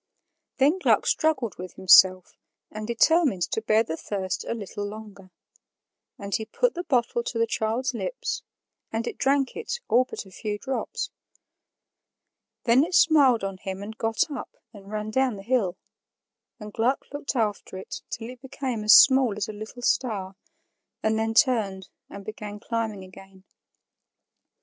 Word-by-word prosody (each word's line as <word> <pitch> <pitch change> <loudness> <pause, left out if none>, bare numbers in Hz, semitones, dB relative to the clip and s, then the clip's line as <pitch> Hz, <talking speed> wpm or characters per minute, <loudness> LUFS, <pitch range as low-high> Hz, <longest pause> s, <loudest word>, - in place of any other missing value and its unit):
Then 290 +7 +3
Gluck - - +3
struggled 265 - 0
with 185 0 -7
himself 185 -1 +6 0.4
and 215 0 -6
determined 240 - +3
to 220 - -1
bear 220 0 +3
the 160 -7 -4
thirst 190 +1 -4
a - - -3
little 205 -1 -6
longer; 205 -2 -9 0.9
and 200 -1 -7
he 220 - 0
put 485 - 0
the 350 - -4
bottle 240 -5 +1
to 235 - -5
the 230 - +3
child's 225 +4 -1
lips, - - -3 0.5
and 225 +1 -2
it - - -6
drank 275 0 +1
it 465 +1 -4
all 250 +2 +4
but 255 - -7
a 190 - -16
few 210 +2 -4
drops. 265 +5 -4 1.5
Then 245 +3 +5
it 350 +3 -2
smiled 280 -10 +5
on 195 -1 -3
him 190 0 -6
and 220 +2 -8
got 225 +7 0
up 275 - -7 0.2
and 200 -2 -13
ran 215 0 -4
down 260 -1 +1
the 195 - -10
hill; 215 -6 0 0.8
and 210 -1 -9
Gluck 245 +5 0
looked 285 -1 -4
after 210 -5 -2
it 190 - -7
till 225 - -5
it 250 -1 -14
became 260 -4 -4
as 215 - +7
small 260 -6 +6
as 205 - -2
a 215 - -6
little 220 +4 -9
star, 200 -8 0 0.7
and 220 0 +1
then 225 0 -1
turned 215 -8 +2 0.2
and 200 -1 -10
began 210 -1 -7
climbing 220 -3 -3
again. 190 0 -15
220 Hz, 160 wpm, -25 LUFS, 200-255 Hz, 1.5 s, as